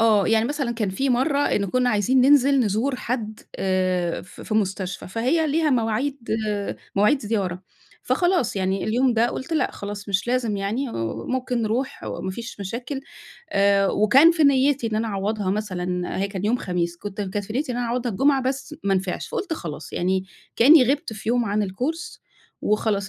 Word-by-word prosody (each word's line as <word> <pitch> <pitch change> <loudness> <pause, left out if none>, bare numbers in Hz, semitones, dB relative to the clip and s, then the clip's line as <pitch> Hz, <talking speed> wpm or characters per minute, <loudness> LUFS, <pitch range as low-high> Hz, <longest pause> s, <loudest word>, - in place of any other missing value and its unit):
آه، 215 -3 +4
يعني 220 0 +3
مثلًا 280 -1 -2
كان 220 -4 -2
في 265 +8 0
مرّة 265 +4 +2
إن 210 -8 +1
كنّا 250 +5 +1
عايزين 235 +5 +3
ننزل 275 0 +5
نزور 235 +5 0
حد 220 -4 -4 0.2
آآ 185 -2 0
في - - -12
في 215 - -3
مستشفى، 190 -4 -2
فهي 255 - +1
ليها 310 +1 +1
مواعيد 250 +3 0 0.8
مواعيد 210 +8 +4
زيارة، 195 -5 -2 0.4
فخلاص 350 - +1
يعني 190 0 0
اليوم 245 +3 +2
ده، 230 +1 +3
قُلت 295 +6 -5
لأ 315 - +1
خلاص، 205 0 -7
مش 190 0 0
لازم 240 -4 0
يعني، 220 +7 -2
وممكن 245 - -2
نروح، 235 +5 -2
وما 190 - -4
فيش 230 +1 -7
مشاكل 240 +8 -4 0.5
آآ 200 -4 +3
وكان 255 - +6
في 320 -3 +2
نيّتي 275 -2 +3
إن 220 - -2
أنا 225 +1 -1
أعوّضها 200 0 -1
مثلًا، 180 -4 -2
هي 195 +1 0
كان 195 -1 -5
يوم 225 +4 +2
خميس، 175 -5 -2
كُنت 205 +3 -7
كانت 200 +1 -3
في 215 - -7
نيّتي 255 +2 -1
إن - - -4
أنا 245 -1 -1
أعوّضها 240 0 -1
الجمعة، 270 +6 +3
بس 265 +3 -3
ما 195 -1 +2
نفعش، 190 -1 -2
فقُلت 380 - -3
خلاص، 160 - -6
يعني 185 +1 0 0.3
كأني 280 +5 +8
غِبت 285 -5 -4
في 215 0 -7
يوم 240 0 +2
عن 205 -1 0
الcourse 295 - -4 0.4
وخلاص 210 -2 0
220 Hz, 180 wpm, -23 LUFS, 195-260 Hz, 0.8 s, كأني